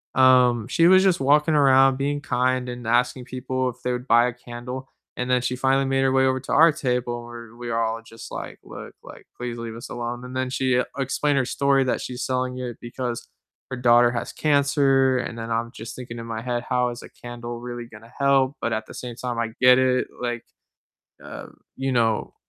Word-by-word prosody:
um, 125 -3 +5
she 165 +6 +3
was 190 +1 +6
just 190 -3 +3
walking 150 +3 +3
around 135 -2 +5
being 145 +1 -1
kind 130 -1 0
and 120 -2 -7
asking 125 +2 +1
people 130 0 -2
if 125 - -9
they 125 - 0
would 125 +1 -4
buy 120 +1 +5
a 125 - -3
candle, 125 +2 -8 0.3
and 125 0 -3
then 125 0 +3
she 125 0 -1
finally 135 +1 +2
made 135 0 +1
her 135 - +2
way 130 0 +3
over 130 0 +1
to 130 - -8
our 165 +1 +7
table 125 -5 -2
and 120 - -10
we're 115 -1 -11
we're 120 -1 -4
all 115 0 -1
just, 115 0 -12
like, - - -7
"Look, - - -10
like, - - -13
please 120 -1 -5
leave 115 -1 -6
us 115 - -9
alone." 120 +1 -5
And 125 +1 -9
then 130 0 -1
she 130 -1 +1 0.2
explained 140 +2 0
her 130 - +2
story 140 +1 +2
that 125 - -1
she's 125 0 -5
selling 130 0 -2
it 125 -2 -5
because 120 0 -5 0.4
her 130 - -3
daughter 120 0 +5
has 120 - -4
cancer, 140 -3 +3
and 115 - -5
then 115 0 -5
I'm 115 +1 -1
just 115 -1 -9
thinking 120 -2 -8
in 115 - -7
my 115 -1 -5
head, 120 0 -2
"How 125 -1 +1
is 120 0 -8
a - - -11
candle 120 0 -8
really 120 -1 -6
gonna 115 0 -15
help?" 140 -1 +2
But, 120 - -1
at 110 0 -3
the - - -11
same 120 -2 -7
time, 120 0 -4
I 115 -1 -2
get 125 0 +7
it. 130 -1 +2
Like, 120 -1 -3 0.8
uh, - - -9 0.3
you 135 0 -2
know, 115 -3 0
125 Hz, 220 wpm, -23 LUFS, 120-130 Hz, 0.8 s, our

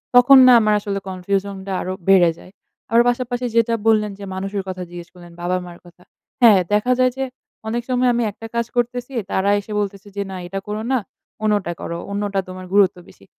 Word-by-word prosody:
তখন 250 +2 +8
না 250 - +8
আমার 215 0 +2
আসলে 200 -1 -3
কনফিউশন 195 +2 -2
টা - - -3
আরও 185 - -3
বেড়ে 190 -3 +6
যায়। 185 - -15 0.4
আরো 230 +1 +6
পাশাপাশি 245 0 -2
যেটা 230 0 +3
বললেন 210 -2 +3
যে 200 - -8
মানুষের 195 +1 -3
কথা 185 -1 -5
জিজ্ঞেস 175 -1 -9
করলেন, 175 -1 -14
বাবা-মার 180 0 -3
কথা। 175 0 -18 0.4
হ্যাঁ, 220 -5 +7
দেখা 210 +5 +2
যায় 255 0 +4
যে 270 - -1 0.4
অনেক 235 +2 -2
সময় 250 0 +2
আমি 240 0 0
একটা 225 - -12
কাজ 235 - +1
করতেছি, 245 +2 -2 0.2
তারা 195 +1 +1
এসে 205 +2 -10
বলতেছে 200 0 -4
যে 200 - -2
"না। - - -6
এটা 195 +2 -4
করো 210 +1 -3
না, 255 - +3 0.4
অন্যটা 205 -5 +1
করো। 170 - -4
অন্যটা 200 -1 -1
তোমার 185 0 -8
গুরুত্ব 200 -2 +4
বেশি।" 95 - -18
205 Hz, 195 wpm, -20 LUFS, 185-235 Hz, 0.4 s, তখন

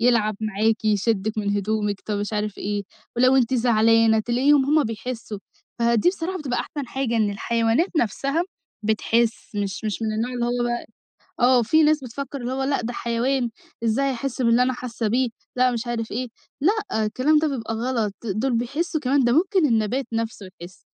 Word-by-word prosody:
يلعب 225 -3 +3
معاكِ، 220 +1 0
يشدِّك 215 0 +1
من 205 -1 0
هدومِك 205 0 -1
طب 210 -1 -1
مش 205 +1 -3
عارف 210 -1 -2
إيه، 205 0 -2 0.3
ولو 255 +2 +5
أنتِ 255 -1 +2
زعلانة 225 -2 +4
تلاقيهم 265 +5 +3
هم 300 +1 +3
بيحسّوا. 225 -1 -5 0.4
فدي 235 +4 +3
بصراحة 370 0 -2
بتبقى 260 -6 -2
أحسن 290 -4 -5
حاجة 245 -2 -2
إن 215 -2 +2
الحيوانات 230 - +1
نفسها 275 - 0 0.4
بتحِس 225 +1 0
مش 200 +1 -3
مش 215 +1 -2
من 220 -1 0
النوع 230 +4 -2
اللي 240 -1 -1
هو 240 0 0
بقى 240 0 -2 0.5
آه. 245 0 +5
في 315 +8 +4
ناس 305 0 +4
بتفكّر 275 +2 -6
إن 240 - -3
هو 260 +1 -2
لأ، 275 +1 0
ده 240 +2 -3
حيوان 240 +2 0 0.3
إزاي 270 +5 +2
هيحِس 260 0 -3
باللي 235 +1 +4
أنا 255 +1 +2
حاسّة 235 -3 -3
بيه، 250 +3 +2 0.3
لأ 255 0 +4
مش 235 0 -3
عارف 230 -2 -3
إيه. 250 +3 -2 0.3
لأ، 390 - +1
الكلام 265 +8 +2
ده 310 0 +1
بيبقى 225 -5 -3
غلط، 225 -3 -1
دول 230 +5 -1
بيحسّوا 295 +7 -1
كمان 270 0 +2
ده 240 - +3
ممكن 365 - +3
النبات 235 +3 0
نفسه 225 -3 -3
يحِس، 175 +2 -12
235 Hz, 180 wpm, -23 LUFS, 220-265 Hz, 0.5 s, ولو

